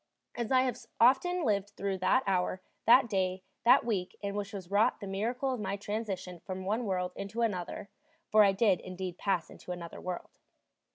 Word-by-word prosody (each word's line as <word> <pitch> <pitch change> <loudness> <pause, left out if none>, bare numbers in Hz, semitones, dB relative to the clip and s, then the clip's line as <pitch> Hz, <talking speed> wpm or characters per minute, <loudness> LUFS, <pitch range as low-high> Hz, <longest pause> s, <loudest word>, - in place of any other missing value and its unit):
And 235 -2 -3
so 265 - +3
I 255 - +6
have 250 -3 -2 0.2
often 300 +9 +4
lived 205 -2 0
through 195 -1 -2
that 255 +8 +3
hour, 185 -1 0 0.3
that 240 +2 +7
day, 185 -3 -1 0.2
that 240 - +6
week, 195 -6 -2
in 200 0 -2
which 205 0 -3
was 195 -3 -8
wrought 205 +2 +3
the 205 - -6
miracle 235 +7 -1
of 250 - -4
my 200 -1 -2
transition 195 -4 -4
from 185 +2 -6
one 220 +5 0
world 180 -2 -1
into 205 +4 -3
another; 200 -1 -2 0.4
for 215 0 +7
I 200 - +5
did 195 -2 +3
indeed 185 -1 -6
pass 190 -5 0
into - - -9
another 170 -1 -7
world. 180 -1 -5
200 Hz, 190 wpm, -31 LUFS, 185-225 Hz, 0.4 s, that